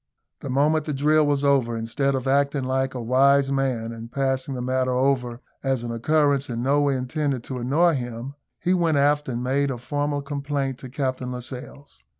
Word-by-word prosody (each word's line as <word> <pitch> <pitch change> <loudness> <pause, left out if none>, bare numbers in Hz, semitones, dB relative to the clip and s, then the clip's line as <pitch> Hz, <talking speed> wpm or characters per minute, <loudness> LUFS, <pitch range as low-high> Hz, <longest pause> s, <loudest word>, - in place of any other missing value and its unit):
The 140 - -7
moment 150 +4 +2
the 150 - -2
drill 150 +2 +3
was 145 -1 +1
over, 130 -5 +2
instead 135 +5 0
of 130 0 -3
acting 140 0 +2
like 130 +1 -1
a 125 - -4
wise 135 +3 +4
man, 130 -4 -1
and 115 0 -9
passing 135 0 -1
the 125 - -4
matter 130 0 0
over 125 -1 0 0.2
as 135 -3 -1
an 120 - -4
occurrence 145 +3 +1
in 120 0 -3
no 140 +2 +3
way 140 -1 +2
intended 130 0 -2
to 130 0 -5
annoy 155 +8 +3
him, 120 0 -4 0.3
he 180 - +1
went 165 -4 +2
aft 145 0 +2
and 120 -1 -3
made 140 +2 +1
a 130 - -3
formal 145 +3 -2
complaint 140 -2 -3
to 130 - -9
Captain 130 -1 -2
Lascelles. 125 +3 -9
135 Hz, 190 wpm, -24 LUFS, 125-145 Hz, 0.3 s, wise